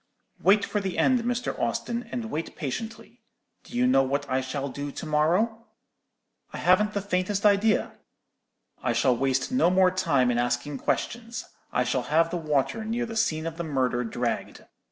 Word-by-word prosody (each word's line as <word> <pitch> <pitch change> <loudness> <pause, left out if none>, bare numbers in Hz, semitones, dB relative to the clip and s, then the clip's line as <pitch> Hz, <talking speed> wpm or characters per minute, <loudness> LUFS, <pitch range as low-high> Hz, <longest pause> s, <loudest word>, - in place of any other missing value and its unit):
Wait 200 +4 +4
for 210 - -1
the 190 -3 -3
end, 255 -1 +4
Mr. 245 +1 -2
Austin, 240 0 -2
and 230 -2 -4
wait 160 +2 -4
patiently. 220 - -6 0.4
Do 240 - -7
you 250 - +3
know 255 - +5
what 140 +2 -1
I 130 0 0
shall 135 +2 -3
do 140 +2 -5
to - - -7
morrow?' 180 +10 +1 0.8
"'I - - -6
haven't 210 +4 +3
the 200 - -2
faintest 200 +1 -1
idea.' 210 +1 +3 0.9
"'I - - 0
shall 130 -2 +3
waste 135 - 0
no 255 -9 +4
more 185 0 +4
time 140 -9 +2
in 120 - 0
asking 120 +4 -1
questions. 235 +1 -2 0.3
I 125 - +2
shall 125 +1 0
have 165 +2 +3
the 180 - -1
water 155 - 0
near 230 +2 -1
the 225 -1 -7
scene 160 -7 0
of 165 -1 -4
the 170 - -3
murder 130 -5 0
dragged. 120 +1 -3
170 Hz, 175 wpm, -26 LUFS, 135-220 Hz, 0.9 s, know